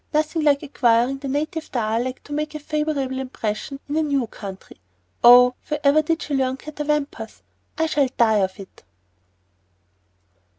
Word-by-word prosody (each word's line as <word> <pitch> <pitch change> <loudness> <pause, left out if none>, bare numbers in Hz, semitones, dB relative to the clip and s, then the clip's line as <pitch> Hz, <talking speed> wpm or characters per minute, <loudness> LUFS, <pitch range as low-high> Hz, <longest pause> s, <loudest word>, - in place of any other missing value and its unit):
Nothing 310 +2 +1
like 290 -1 +3
acquiring 250 -2 +2
the 275 - -6
native 310 +4 -3
dialect 235 +2 -2
to 290 - -8
make 305 +1 -3
a - - -4
favorable 295 -3 -2
impression 255 +1 -4
in 290 - -3
a 315 - +2
new 280 -5 0
country. 195 - -10 0.4
Oh, 250 +1 +8
wherever 300 0 +3
did 325 +2 -1
she 295 - -5
learn 260 -1 0
'catawampus'? 295 -6 -4 0.3
I 320 - +2
shall 290 -4 +1
die 220 -3 +4
of 190 0 -1
it." 195 - -13
275 Hz, 145 wpm, -22 LUFS, 245-300 Hz, 0.4 s, Oh